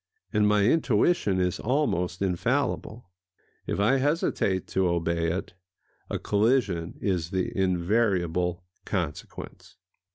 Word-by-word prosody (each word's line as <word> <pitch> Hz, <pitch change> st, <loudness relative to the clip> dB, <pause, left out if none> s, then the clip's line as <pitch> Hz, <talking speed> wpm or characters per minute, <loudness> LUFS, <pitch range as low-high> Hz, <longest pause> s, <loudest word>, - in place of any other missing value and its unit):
And 105 Hz, -1 st, +3 dB
my 105 Hz, -1 st, +3 dB
intuition 120 Hz, -, +2 dB
is 90 Hz, -1 st, 0 dB
almost 100 Hz, -, 0 dB
infallible. 115 Hz, +2 st, -1 dB, 0.6 s
If -, -, -2 dB
I 110 Hz, +7 st, +4 dB
hesitate 135 Hz, -, 0 dB
to 95 Hz, -1 st, +1 dB
obey 85 Hz, -1 st, 0 dB
it, 90 Hz, +2 st, -4 dB, 0.6 s
a -, -, -1 dB
collision 105 Hz, -6 st, +1 dB
is 90 Hz, -5 st, -1 dB
the 95 Hz, -1 st, -2 dB
invariable 90 Hz, -2 st, +1 dB, 0.2 s
consequence. 85 Hz, -7 st, -5 dB
95 Hz, 105 wpm, -27 LUFS, 90-110 Hz, 0.6 s, I